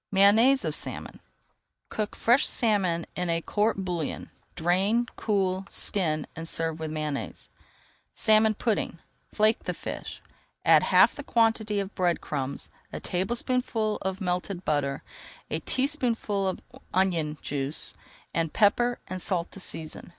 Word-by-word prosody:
MAYONNAISE 220 Hz, +8 st, +5 dB
OF -, -, 0 dB
SALMON -, -, -5 dB, 0.7 s
Cook 210 Hz, -1 st, -3 dB
fresh 245 Hz, +4 st, +5 dB
salmon 190 Hz, -7 st, +3 dB
in 180 Hz, -1 st, -2 dB
a 165 Hz, 0 st, +1 dB
court 205 Hz, +2 st, 0 dB
bouillon, 175 Hz, -4 st, -3 dB, 0.2 s
drain, 190 Hz, +8 st, +2 dB
cool, 195 Hz, -2 st, 0 dB
skin, 155 Hz, -7 st, -1 dB
and 165 Hz, +1 st, -5 dB
serve 160 Hz, -1 st, 0 dB
with 160 Hz, -1 st, -3 dB
Mayonnaise. 150 Hz, -2 st, -4 dB, 0.7 s
SALMON 215 Hz, 0 st, +4 dB
PUDDING 215 Hz, -6 st, -1 dB, 0.3 s
Flake 215 Hz, +2 st, +2 dB
the -, -, -2 dB
fish, -, -, -6 dB, 0.5 s
add -, -, +7 dB
half -, -, +5 dB
the 285 Hz, -, -7 dB
quantity 225 Hz, -5 st, +1 dB
of 195 Hz, 0 st, -4 dB
bread 175 Hz, -2 st, +1 dB
crumbs, 140 Hz, -2 st, -3 dB, 0.2 s
a -, -, -5 dB
tablespoonful 225 Hz, +3 st, -1 dB
of 190 Hz, +1 st, -3 dB
melted 180 Hz, 0 st, -2 dB
butter, 140 Hz, -2 st, 0 dB, 0.5 s
a -, -, 0 dB
teaspoonful 240 Hz, -8 st, 0 dB
of 185 Hz, -, -3 dB, 0.3 s
onion 170 Hz, -5 st, +1 dB
juice, 140 Hz, +1 st, -2 dB, 0.4 s
and 165 Hz, -2 st, -1 dB
pepper 240 Hz, +4 st, +3 dB
and 185 Hz, 0 st, -6 dB
salt 175 Hz, -2 st, -1 dB
to -, -, -8 dB
season. 160 Hz, -3 st, -5 dB
190 Hz, 135 wpm, -27 LUFS, 165-220 Hz, 0.7 s, add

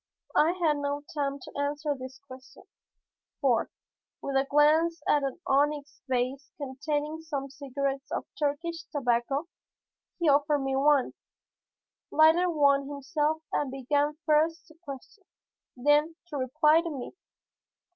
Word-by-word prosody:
I 320 Hz, +3 st, +4 dB
had 330 Hz, -5 st, +1 dB
no 285 Hz, 0 st, -2 dB
time 280 Hz, -2 st, -1 dB
to -, -, -11 dB
answer 290 Hz, +1 st, -1 dB
this 260 Hz, -1 st, -9 dB
question, 255 Hz, 0 st, -13 dB, 0.8 s
for, 245 Hz, -5 st, +2 dB, 0.5 s
with 275 Hz, -, -4 dB
a 270 Hz, 0 st, +2 dB
glance 315 Hz, +3 st, +4 dB
at 295 Hz, -, +4 dB
an 275 Hz, +2 st, -3 dB
onyx 285 Hz, +1 st, 0 dB
vase 260 Hz, +2 st, -1 dB
containing 295 Hz, +2 st, -3 dB
some 280 Hz, -4 st, -4 dB
cigarettes 275 Hz, 0 st, -3 dB
of -, -, -2 dB
Turkish 325 Hz, +3 st, -2 dB
tobacco, 270 Hz, +2 st, 0 dB, 0.7 s
he 340 Hz, -, 0 dB
offered 290 Hz, +1 st, +4 dB
me 270 Hz, 0 st, -1 dB
one, 280 Hz, -1 st, +3 dB, 1.0 s
lighted 320 Hz, +3 st, +5 dB
one 280 Hz, -3 st, +3 dB
himself 300 Hz, +2 st, -1 dB
and 290 Hz, -, 0 dB
began 285 Hz, +3 st, 0 dB
first 320 Hz, +2 st, +2 dB
to 315 Hz, -, -17 dB
question, 285 Hz, +7 st, -10 dB, 0.5 s
then 295 Hz, +5 st, +3 dB
to 295 Hz, -, -4 dB
reply 300 Hz, +5 st, +3 dB
to 335 Hz, -, -4 dB
me. 270 Hz, -5 st, -6 dB
290 Hz, 130 wpm, -28 LUFS, 275-310 Hz, 1.0 s, lighted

